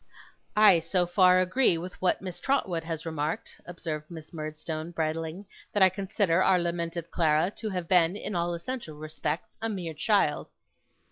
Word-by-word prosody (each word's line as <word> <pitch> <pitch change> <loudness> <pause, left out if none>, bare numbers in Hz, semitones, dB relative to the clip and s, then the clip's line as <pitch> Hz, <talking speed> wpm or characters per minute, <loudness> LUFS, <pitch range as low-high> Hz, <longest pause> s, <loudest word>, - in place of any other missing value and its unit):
'I 205 -5 +7
so 175 +2 +1
far 180 0 +5
agree 185 0 +3
with 180 +2 -6
what 185 +1 +1
Miss 180 -2 -6
Trotwood 190 -12 0
has 165 -1 -5
remarked,' 160 -1 -4
observed 160 -3 -5
Miss 160 -1 -10
Murdstone, 155 +1 -5
bridling, 165 +3 -3 0.3
'that 205 - +4
I 190 - +8
consider 185 -2 0
our 190 -1 +5
lamented 170 -1 -3
Clara 160 +2 +2
to 220 - -3
have 180 -4 -3
been, 175 0 +4
in 210 - -5
all 170 0 0
essential 170 -2 -6
respects, 155 +1 -4
a 225 - -1
mere 180 -6 -4
child. 155 -1 +1
170 Hz, 160 wpm, -28 LUFS, 160-185 Hz, 0.3 s, I